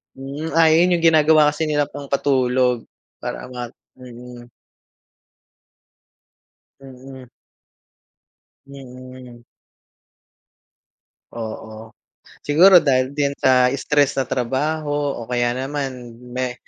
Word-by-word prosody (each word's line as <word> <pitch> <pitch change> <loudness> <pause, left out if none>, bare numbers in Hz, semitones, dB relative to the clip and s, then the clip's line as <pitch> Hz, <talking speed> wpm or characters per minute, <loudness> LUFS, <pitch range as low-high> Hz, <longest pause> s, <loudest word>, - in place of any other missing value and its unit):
Hmm, 140 +4 -7
ah, 165 -1 +4
yun 170 +3 +3
yung 170 - 0
ginagawa 155 -1 +4
kasi 150 +2 -3
nila 145 -2 -1
pangpatulog 130 -3 -1 0.3
para - - -7
ma 125 -1 -6 0.3
mm. 125 -1 -12 2.4
Mm. 130 -1 -13 1.4
Mm. 130 -2 -13 1.9
Oo. 110 -1 -9 0.5
Siguro 180 +6 +6
dahil 130 -3 +1
din 140 -1 -1
sa 125 -1 +3
stress 145 0 +1
sa - - 0
trabaho. 145 +5 -2 0.3
O - - -17
kaya 120 0 -1
naman 130 -3 -5 0.2
may 125 0 -3
130 Hz, 90 wpm, -20 LUFS, 125-145 Hz, 2.4 s, Siguro